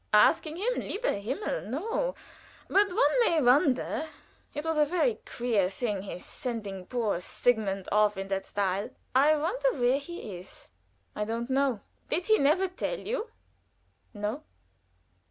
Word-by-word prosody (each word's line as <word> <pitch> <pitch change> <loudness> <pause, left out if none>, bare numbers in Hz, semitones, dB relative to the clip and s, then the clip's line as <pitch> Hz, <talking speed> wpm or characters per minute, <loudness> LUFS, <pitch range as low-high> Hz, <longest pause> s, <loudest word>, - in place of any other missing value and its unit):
"Asking 310 +8 +4
him 435 +8 0
lieber 460 +5 -1
Himmel! 260 - -3
no; 450 - -1 0.5
but 400 +1 +4
one - - +3
may 335 -7 +3
wonder 270 +3 +3 0.4
It 295 +2 -5
was 320 -1 +1
a - - +7
very 360 +9 +1
queer 225 -6 +1
thing 200 0 -2
his 190 -2 -7
sending 205 -8 -5
poor 230 -8 0
Sigmund 195 -1 0
off 210 -1 +3
in 195 0 -4
that 195 0 -2
style. 200 0 -1 0.2
I 285 +4 +5
wonder 470 +11 +1
where 250 +2 +2
he 280 - -7
is." 180 - -14 0.4
"I 210 - -1
don't 230 +3 -3
know." 265 -5 +2 0.3
"Did 350 +3 0
he 435 0 +4
never 310 +7 +3
tell 370 +7 -3
you?" 465 0 -3 0.8
"No." 210 +6 -3
260 Hz, 145 wpm, -29 LUFS, 210-345 Hz, 0.8 s, a